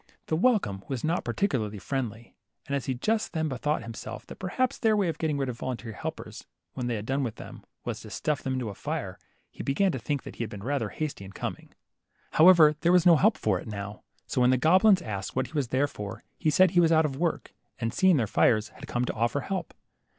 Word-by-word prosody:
The 155 - -1
welcome 180 - +2
was 130 -4 -4
not 165 +3 0
particularly 115 - -1
friendly, 115 0 -4 0.3
and 140 - -2
as 140 - -2
he 130 - 0
just 215 - -1
then 160 -2 0
bethought 145 0 -1
himself 115 0 -7
that - - -10
perhaps 250 +7 -1
their 220 -2 +3
way 195 -4 +2
of 165 - -4
getting 155 -2 0
• - - -3
rid 135 - 0
of 120 -2 -5
voluntary 125 -3 -4
helpers, - - -7 0.3
when 125 -2 -3
they 120 - -1
had 105 -1 -5
done 135 +3 0
with 120 -5 -2
them, - - -10 0.2
was - - -3
to - - -10
stuff 150 -2 -1
them 130 - -2
into 125 -4 -2
a - - -6
fire, - - -4 0.3
he - - -8
began 185 +8 +1
to 130 - -3
think 140 +4 -2
he - - -6
had 115 - -5
been 100 -2 -8
rather 130 -4 -1
hasty 150 -7 -4
in 95 0 -10
coming. - - -5 0.6
However, 160 -2 +7
there 170 +1 +3
was 180 -1 +5
no 175 -2 +8
help 140 - +3
for 100 -4 +1
it - - -10
now, 105 -1 -6 0.2
so 130 - -1
when 125 - +5
the 130 - +4
goblins 185 - +5
asked 100 -7 -5
what 130 - +1
he - - -13
was 145 -5 0
there 130 +4 +2
for, 105 -7 -7 0.2
he 155 - +2
said 185 +3 +5
he 180 - +3
was 165 -1 +4
out 160 -1 +5
of 140 -3 -2
work, 170 +1 -2 0.2
and 115 -1 -2
seeing 185 -3 +4
their 120 - +2
fires, 110 +1 +2
had - - -12
come 120 +1 -1
to - - -2
offer 120 +5 0
help. 185 -2 -4
135 Hz, 245 wpm, -28 LUFS, 115-165 Hz, 0.6 s, no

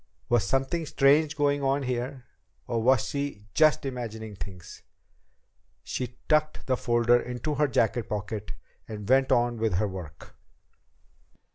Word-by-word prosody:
Was 120 -4 +3
something 135 - -1
strange 145 +3 +3
going 145 -1 +2
on 135 +1 +1
here? 125 +1 -3 0.4
Or 115 -1 -1
was 130 0 +3
she 140 -7 -4
just 155 -2 +4
imagining 110 -5 -5
things? 90 0 -9 1.0
She 125 -1 -5
tucked 155 0 +1
the 130 - +1
folder 120 -1 +3
into 125 +5 -4
her 150 +1 +2
jacket 115 -2 0
pocket 105 -1 -4 0.3
and 105 -2 -7
went 135 +1 +3
on 120 0 +2
with 110 -4 0
her 105 +4 +1
work. 90 -6 -9
120 Hz, 135 wpm, -27 LUFS, 110-140 Hz, 1.0 s, just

